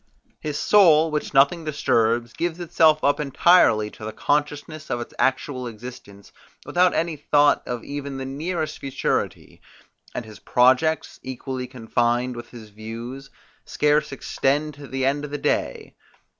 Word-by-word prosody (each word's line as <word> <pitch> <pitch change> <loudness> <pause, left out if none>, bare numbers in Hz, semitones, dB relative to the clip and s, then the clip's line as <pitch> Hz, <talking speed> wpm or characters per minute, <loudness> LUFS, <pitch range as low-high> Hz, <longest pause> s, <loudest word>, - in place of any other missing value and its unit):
His 150 -1 -4
soul, 165 -6 +5
which 150 0 -2
nothing 145 +5 +4
disturbs, 120 -5 +1
gives 170 0 -3
itself 160 -3 +3
up 145 - +2
entirely 140 -7 +4
to - - -13
the 110 - -4
consciousness 150 +4 -2
of 120 - -1
its 120 - -7
actual 130 -1 0
existence, 110 -3 -11 0.3
without 180 0 +2
any 165 0 0
thought 145 0 +3
of 120 -2 -4
even 140 -1 -6
the 135 - -5
nearest 155 +3 -3
futurity; 135 -1 -3 0.5
and 120 - -4
his 110 -1 -12
projects, 130 +6 +2
equally 130 0 -5
confined 120 0 -1
with 120 0 -9
his 115 -3 -12
views, 115 +6 -8 0.3
scarce 150 0 +1
extend 145 +2 -1
to 145 0 -11
the 130 0 -2
end 140 +2 0
of 150 - -5
the 145 - -4
day. - - -2
135 Hz, 145 wpm, -23 LUFS, 120-150 Hz, 0.5 s, soul